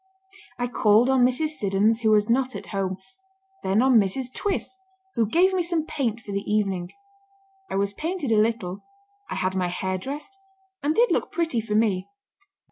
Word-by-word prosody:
I 245 - -1
called 235 +1 +4
on 260 -2 +4
Mrs. 255 +5 +2
Siddons, 215 -4 +1
who 220 - +2
was 210 -1 +4
not 255 +2 +1
at - - -6
home; 190 -1 -1 0.6
then 195 +5 +2
on 260 -3 +6
Mrs. 245 +6 -1
Twiss, 395 -1 -2 0.4
who 230 -3 +1
gave 370 +8 +4
me 370 - +2
some 335 -2 -1
paint 235 -8 -2
for 205 - -9
the 200 0 -1
evening. 195 -4 0 0.8
I - - -3
was 200 +1 0
painted 320 - -3
a 215 -1 +5
little, 215 -4 -1 0.5
I - - -3
had 185 0 -1
my 185 -1 0
hair 185 +1 -2
dressed, 295 - -7 0.5
and 300 +2 0
did 480 +4 +4
look - - 0
pretty 325 -9 0
for 210 -1 -3
me." 205 -4 +1
225 Hz, 180 wpm, -25 LUFS, 200-275 Hz, 0.8 s, on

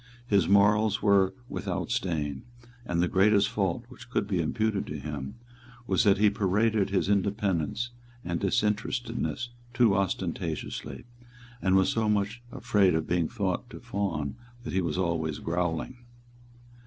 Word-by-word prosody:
His 100 -7 +3
morals 105 +1 +4
were 95 -2 +4
without - - -3
stain; 75 -6 -1 0.5
and 85 0 +1
the - - +2
greatest 100 +2 +4
fault 100 +3 -1
which 125 -1 -13
could 120 - 0
be 95 -4 0
imputed 110 +5 -1
to 75 - -4
him 70 -2 -6 0.5
was - - +2
that 100 -1 +5
he 105 0 +4
paraded 105 +1 +1
his 95 -1 +1
independence 100 +1 0 0.3
and 85 -1 -1
disinterestedness 115 +4 -1 0.3
too 120 -6 +4
ostentatiously, 95 -2 -3 0.6
and 95 0 +3
was 95 0 +4
so 110 -1 +1
much 105 +3 0
afraid 95 -7 +2
of 80 - 0
being 85 -2 +1
thought 100 -5 -2
to - - -9
fawn 90 -6 -3 0.3
that 120 - -5
he 95 - +2
was 85 0 -2
always 80 -4 -1
growling. 85 +7 -2
100 Hz, 140 wpm, -28 LUFS, 85-105 Hz, 0.6 s, that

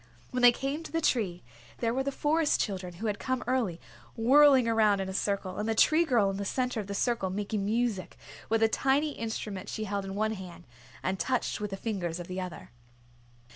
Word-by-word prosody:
When 250 -1 -1
they 245 0 +9
came 275 +5 -3
to - - -9
the 330 - 0
tree, 205 - 0 0.3
there 230 0 0
were 265 - 0
the 280 +1 -1
Forest 300 +2 +1
Children, 185 -4 -3
who 205 +7 -6
had 210 -2 -1
come 260 -1 -2
early, 235 -9 0 0.4
whirling 265 +1 +6
around 215 -3 +3
in 190 - -2
a 190 - -5
circle, 195 -1 -2
and 215 +2 -1
the 225 - +1
Tree 315 +8 +5
Girl 230 -9 +3
in 195 - -5
the 200 - -3
center 250 +3 -1
of 205 - -5
the 200 - -4
circle 230 -3 0
making 205 +1 -2
music 220 -2 -1 0.3
with 225 0 +2
a - - +6
tiny 275 +6 +1
instrument 220 -6 -5
she 215 - -3
held 200 -1 -2
in 195 0 -6
one 215 +1 0
hand 180 -4 -9 0.4
and 190 0 -1
touched 255 -4 -1
with 210 - -2
the 195 - -5
fingers 185 -6 -3
of 175 - -6
the 185 +1 -4
other. 180 -8 -8
220 Hz, 215 wpm, -29 LUFS, 195-250 Hz, 0.4 s, they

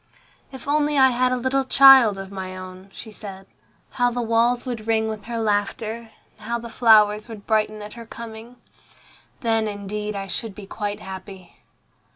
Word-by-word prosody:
"If 265 0 -11
only 295 0 +1
I 265 -1 +6
had 250 +1 +1
a 255 - +1
little 260 +2 0
child 265 -6 +7
of 195 0 -8
my 185 -1 -6
own," 185 +1 -10
she 220 - -10
said, 195 -2 -10 0.5
"how 245 -1 +1
the 245 0 -4
walls 235 +2 +2
would 230 -4 -5
ring 220 -1 +1
with 215 -2 -6
her 235 0 -4
laughter, 220 +1 -2 0.3
and 210 - -12
how 235 0 -1
the 235 0 -9
flowers 215 -2 +4
would 210 -3 -10
brighten 215 -1 0
at 210 - -9
her 235 -1 -11
coming. 230 +1 -10 0.9
Then, 225 -2 +1
indeed, 210 +1 -5
I 195 -1 -4
should 205 +1 -5
be 210 - -9
quite 205 +1 -5
happy." 190 -2 -10
220 Hz, 180 wpm, -23 LUFS, 205-235 Hz, 0.9 s, child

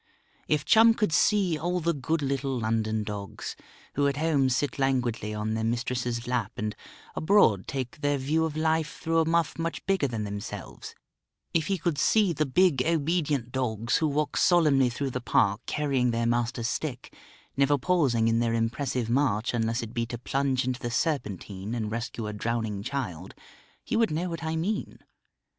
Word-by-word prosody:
If 150 -2 +1
Chum 225 +1 +6
could 210 -9 0
see 190 -5 +3
all 175 +3 -1
the 170 0 +1
good 150 +2 -1
little 135 -1 -1
London 110 -1 0
dogs, 105 -2 -6 0.4
who 145 0 +2
at 140 0 -1
home 145 -4 +2
sit 135 +3 -1
languidly 125 -5 0
on 105 +1 -2
their 110 0 -1
mistress's 120 +1 -1
lap, 125 -4 -1
and 105 0 -3 0.4
abroad 155 - +3
take 130 +1 -4
their 145 -1 +1
view 150 +5 +1
of 155 -1 -2
life 160 0 0
through 165 -1 +1
a 160 - +2
muff 165 -1 +1
much 165 0 -3
bigger 195 -7 +2
than 115 -4 -3
themselves; 100 0 -7 0.6
if 160 -2 +1
he 195 - +1
could 165 -3 -1
see 205 +1 +3
the 155 -1 0
big 160 -1 +3
obedient 150 -5 0
dogs, 120 -3 0
who 160 - +1
walk 150 +1 -1
solemnly 150 -7 +4
through 135 +3 -3
the 125 - -3
Park 100 -2 +2
carrying 135 -4 +1
their 115 0 0
master's 120 0 0
stick, 130 -1 -4 0.4
never 140 +1 +3
pausing 135 -9 +2
in 115 0 +2
their 115 -1 +1
impressive 120 +2 -1
march 120 -3 +1
unless 115 0 0
it 115 0 -8
be 115 -1 -1
to 120 - -5
plunge 130 +1 0
into 130 0 -2
the 120 - -3
Serpentine 105 - -2
and 110 -3 -3
rescue 115 0 -4
a 105 - -4
drowning 110 -1 -2
child, 100 - -5 0.5
he - - -2
would 225 -2 +3
know 165 +4 -2
what 165 -1 -5
I 160 0 -2
mean. 200 +7 -2
130 Hz, 180 wpm, -27 LUFS, 115-155 Hz, 0.6 s, Chum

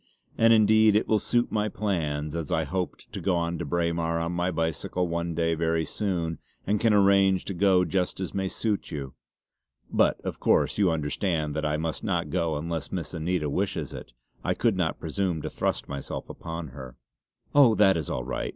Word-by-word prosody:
And 115 0 +5
indeed 110 -1 +5
it 105 - +2
will 110 - +3
just - - -6
suit 120 0 +2
my 105 0 0
plans, 75 -8 -2
as 80 -3 -4
I 80 - +2
hoped 90 +4 -4
to - - -4
go 85 -3 0
to 85 - -4
Braemar 85 +1 0
on 85 +1 -2
my 90 +1 0
bicycle 80 +2 -1
one 85 0 -2
day 85 0 +1
very 80 0 0
soon 85 -6 -2 0.3
and 105 +1 +1
can 115 - +4
arrange 100 -2 +4
to 95 - -3
go 90 0 +3
just 90 -1 -1
as 95 - -4
may 95 -1 -1
suit 105 +1 -2
you. 70 -5 -5 0.8
But - - +3
of - - -5
course - - +2
you 100 -3 +4
understand 75 0 -1
that 75 0 0
I 75 0 0
must 80 0 -3
not - - -1
go 80 -2 0
unless 80 0 -4
Miss 85 -4 -4
Anita 85 -1 -1
wishes 80 -2 -2
it. - - -9 0.3
I - - 0
could 115 -4 +2
not 90 -4 -1
presume 85 +1 -1
to - - -4
thrust - - -2
myself 70 -1 -5
upon 80 -2 -6
her." 65 -2 -10 0.6
"Oh 135 -6 +6
that 95 -2 +5
is 80 -3 -3
all 60 - -2
right!" 65 - -3
85 Hz, 195 wpm, -27 LUFS, 80-95 Hz, 0.8 s, Oh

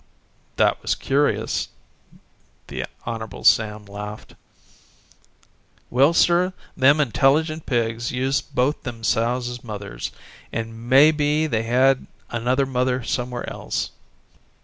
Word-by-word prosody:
"That - - +2
was - - 0
curious." 140 +2 0 1.0
The - - -3 0.2
Hon. 115 -1 -6
Sam 105 -1 +3
laughed: 105 +1 -8 1.6
"Well, 135 +5 +5
sir, 175 +2 +3 0.2
them 140 +3 +5
intelligent 150 +4 +2
pigs 115 -1 -1
used 130 +2 -1
both 130 +4 +1
them 115 -2 -7
sows 120 +2 +1
as 120 -1 -7
mothers, 100 - -6 0.4
and 115 +1 -5
may 140 +4 +7
be 150 0 +1
they 115 -8 0
had 130 +2 +3 0.2
another 125 +4 +1
mother 125 -1 0
somewhere 125 0 -3
else. - - -3
125 Hz, 110 wpm, -23 LUFS, 115-140 Hz, 1.6 s, may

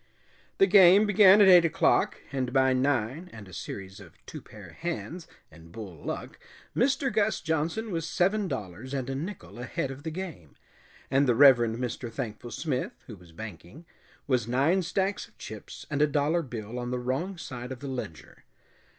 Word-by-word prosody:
The 195 - +6
game 195 +1 +7
began 205 0 +7
at 200 - +7
eight 180 -2 +8
o'clock, 165 - +2
and 130 -3 -2
by 130 0 +3
nine 130 +5 0
and 110 -3 -11
a 95 - -14
series 95 +3 -7
of 90 -5 -14
two - - -8
pair - - -13
hands 170 0 -5 0.2
and 85 +1 -15
bull 95 -8 -9
luck - - -6 0.4
Mr. 270 +1 +1
Gus 215 0 +1
Johnson 165 +8 -2
was 165 -2 -2
seven 195 +3 +1
dollars 120 - -5
and 135 -1 -3
a - - -2
nickel 155 -2 -7
ahead 125 +2 -3
of 135 +1 -9
the 160 - -4
game, 160 - -8 0.6
and 135 +1 +3
the 120 - +3
Reverend 120 -4 +6
Mr. 120 -1 -4
Thankful 115 0 -6
Smith, 130 -1 -4
who 115 - -9
was 90 -3 -17
banking, 110 - -10 0.4
was 125 -5 0
nine 140 +10 +2
stacks 190 +3 -1
of - - -29
chips - - -9
and 145 0 0
a 150 - +5
dollar 150 +4 +1
bill 120 -4 -6
on 120 0 -4
the 125 - -2
wrong 135 +10 -3
side 125 -5 -7
of 130 - -6
the 140 - -7
ledger. 125 - -7
135 Hz, 180 wpm, -28 LUFS, 120-175 Hz, 0.6 s, eight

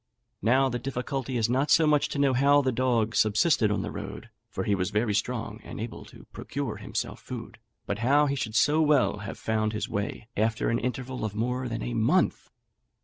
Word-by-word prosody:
Now 130 +6 +4
the 120 -1 -2
difficulty 130 0 -3
is 115 - +2
not 130 +5 +1
so 160 - +5
much 150 -1 +3
to - - -4
know 140 -2 +3
how 140 +3 +4
the 130 - +1
dog 120 -3 +1
subsisted 110 +2 +3
on 105 - 0
the - - -4
road - - -7 0.2
(for - - -3
he 105 - +1
was 90 -1 0
very 105 +1 0
strong, 110 +1 -2
and - - -8
able 115 +2 -6
to - - -15
procure - - -4
himself - - -4
food), - - -8 0.3
but 100 - -3
how 140 +5 +4
he 140 - 0
should 110 -5 -4
so 150 +5 +4
well 145 -8 +3
have 105 - -6
found 110 -1 -1
his 110 - -2
way 105 +1 -4
after 110 +1 +1
an 115 - +1
interval 125 0 -4
of 105 -2 -3
more 125 +3 -1
than 115 0 -4
a 120 - -3
month! 120 +11 +1
120 Hz, 205 wpm, -27 LUFS, 110-135 Hz, 0.3 s, so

